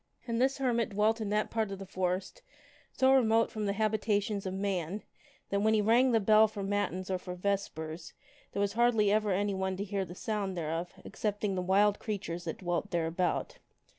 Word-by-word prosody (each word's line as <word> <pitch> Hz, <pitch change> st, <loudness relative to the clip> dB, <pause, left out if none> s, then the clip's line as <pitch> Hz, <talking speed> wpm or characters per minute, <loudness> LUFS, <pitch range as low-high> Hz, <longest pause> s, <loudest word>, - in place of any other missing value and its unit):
And 235 Hz, 0 st, -1 dB
this 265 Hz, +1 st, +2 dB
hermit 240 Hz, -4 st, +1 dB
dwelt 215 Hz, +3 st, +1 dB
in 210 Hz, -, -2 dB
that 210 Hz, +1 st, 0 dB
part 220 Hz, -2 st, 0 dB
of 195 Hz, -, -4 dB
the 195 Hz, -, -8 dB
forest 185 Hz, 0 st, -2 dB, 0.5 s
so 265 Hz, +1 st, +4 dB
remote 230 Hz, -3 st, +3 dB
from 215 Hz, -2 st, -3 dB
the 200 Hz, -, +1 dB
habitations 210 Hz, -1 st, 0 dB
of 185 Hz, -, -3 dB
man 195 Hz, -1 st, -2 dB, 0.5 s
that 200 Hz, -, +2 dB
when 220 Hz, +1 st, +3 dB
he 215 Hz, -, +3 dB
rang 240 Hz, +4 st, +4 dB
the 225 Hz, -, +4 dB
bell 215 Hz, +1 st, +6 dB
for 205 Hz, -2 st, -6 dB
matins 195 Hz, -2 st, -2 dB
or 185 Hz, -, 0 dB
for 180 Hz, 0 st, -7 dB
vespers, 175 Hz, -4 st, -3 dB, 0.4 s
there -, -, -4 dB
was 200 Hz, 0 st, 0 dB
hardly 225 Hz, -3 st, +3 dB
ever 215 Hz, 0 st, +2 dB
anyone 190 Hz, -1 st, 0 dB
to 200 Hz, -, -2 dB
hear 200 Hz, -1 st, -2 dB
the 175 Hz, -1 st, -9 dB
sound 200 Hz, -3 st, -3 dB
thereof 165 Hz, +2 st, -3 dB
excepting 205 Hz, -1 st, -2 dB
the 185 Hz, -, -1 dB
wild 200 Hz, +3 st, +3 dB
creatures 180 Hz, -5 st, -4 dB
that 160 Hz, -, -4 dB
dwelt 175 Hz, -2 st, -2 dB
thereabout. 170 Hz, +1 st, -1 dB
200 Hz, 195 wpm, -31 LUFS, 185-215 Hz, 0.5 s, bell